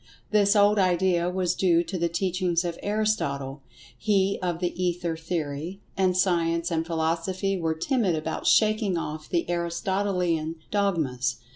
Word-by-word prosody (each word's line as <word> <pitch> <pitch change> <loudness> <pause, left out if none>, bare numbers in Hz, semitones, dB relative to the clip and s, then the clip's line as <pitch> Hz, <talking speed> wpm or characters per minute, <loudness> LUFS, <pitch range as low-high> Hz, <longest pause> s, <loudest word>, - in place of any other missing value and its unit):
This 205 -1 +4
old 205 0 +5
idea 180 -1 +2
was 180 -1 0
due 175 -2 +3
to 190 - -6
the 170 0 +1
teachings 180 0 0
of 170 -1 -4
Aristotle—he 195 - -1
of 175 -2 -1
the 180 +1 -2
Ether 175 -2 -1
Theory—and 170 +4 -2
Science 170 -2 +1
and 165 0 -1
Philosophy 170 +4 -1
were 165 -3 -1
timid 200 - +1
about 160 +1 -3
shaking 215 -4 +3
off 155 -1 -5
the 170 - 0
Aristotelian 175 -1 -1 0.2
dogmas. 160 -12 0
175 Hz, 130 wpm, -26 LUFS, 165-195 Hz, 0.2 s, old